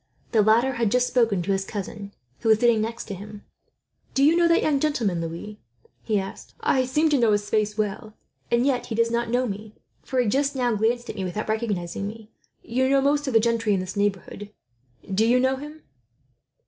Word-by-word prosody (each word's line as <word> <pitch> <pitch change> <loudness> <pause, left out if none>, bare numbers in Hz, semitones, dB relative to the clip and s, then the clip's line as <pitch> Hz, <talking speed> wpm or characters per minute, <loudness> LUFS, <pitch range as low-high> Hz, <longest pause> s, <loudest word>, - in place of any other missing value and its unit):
The 220 - +4
latter 225 +5 +4
had 235 -3 0
just 250 +3 +2
spoken 230 -8 +1
to 195 - -1
his 195 0 0
cousin, 200 0 -6 0.3
who 225 - -1
was 220 - +6
sitting 235 -1 +3
next 230 +2 -4
to 205 - -6
him. 205 +2 -10 0.7
"Do 270 - +3
you 310 +4 +5
know 340 0 +4
that 335 - +3
young 290 -3 +2
gentleman, 230 - 0
Louis?" 170 +6 -6 0.4
he 215 -3 0
asked. 195 0 -8
"I 260 -1 +2
seem 300 +5 +2
to 290 -3 +2
know 230 -3 +4
his 205 0 -2
face 210 -1 0
well; 215 +1 -3 0.3
and 240 +1 +2
yet 260 -3 0
he 225 - -4
does 230 0 +2
not 235 0 -1
know 250 +2 +1
me, 210 +1 -7 0.3
for 260 - -2
he 245 - +2
just 275 +5 +1
now 245 -2 +1
glanced 235 +3 0
at - - -13
me, 190 - -3
without 185 +3 -4
recognizing 205 -4 -2
me. 220 +1 -10 0.3
You 260 +3 0
know 275 0 +4
most 285 +1 +1
of 265 - -1
the 225 - +6
gentry 230 -2 +1
in - - 0
this 185 0 -5
neighbourhood. 205 0 -2 0.6
Do 205 +3 +3
you 240 +3 +4
know 260 +1 +1
him?" 300 +3 -10
225 Hz, 215 wpm, -24 LUFS, 205-255 Hz, 0.7 s, was